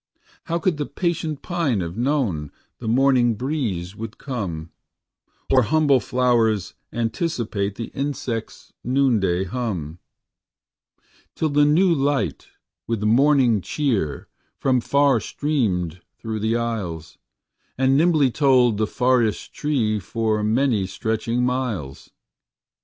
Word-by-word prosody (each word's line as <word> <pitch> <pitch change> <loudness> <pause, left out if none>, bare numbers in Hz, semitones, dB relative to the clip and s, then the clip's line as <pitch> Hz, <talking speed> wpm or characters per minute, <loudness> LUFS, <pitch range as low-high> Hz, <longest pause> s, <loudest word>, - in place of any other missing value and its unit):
How 170 - -1
could 170 -1 0
the 145 - -3
patient 165 -4 -2
pine 165 - 0
have 85 0 -5
known 115 - -1 0.3
The 115 - -6
morning 125 -1 +3
breeze 105 - -3
would 110 0 -7
come, 90 - -5 0.8
Or 130 - +6
humble 140 +3 +3
flowers 115 -6 +1 0.2
anticipate 115 - -2
The 115 - -6
insectâs 135 -5 -4
noonday 115 -9 +2
hum,â 90 - -4 1.4
Till 160 - 0
the 145 0 +4
new 170 +5 +4
light 140 -1 -1 0.4
with 115 -3 -2
morning 125 -1 +4
cheer 110 - -1 0.3
From 130 -2 +1
far 140 -1 +3
streamed 95 - -1 0.2
through 110 -1 -4
the 110 +2 0
aisles, 95 -9 -4 0.6
And 135 +1 +3
nimbly 155 -4 +3
told 125 -6 +3
the 110 - +1
forest 125 -3 +1
trees 115 -8 0
For 110 -2 -1
many 110 -2 +1
stretching 115 +4 -1
miles? 115 - -3
120 Hz, 115 wpm, -22 LUFS, 105-140 Hz, 1.4 s, Or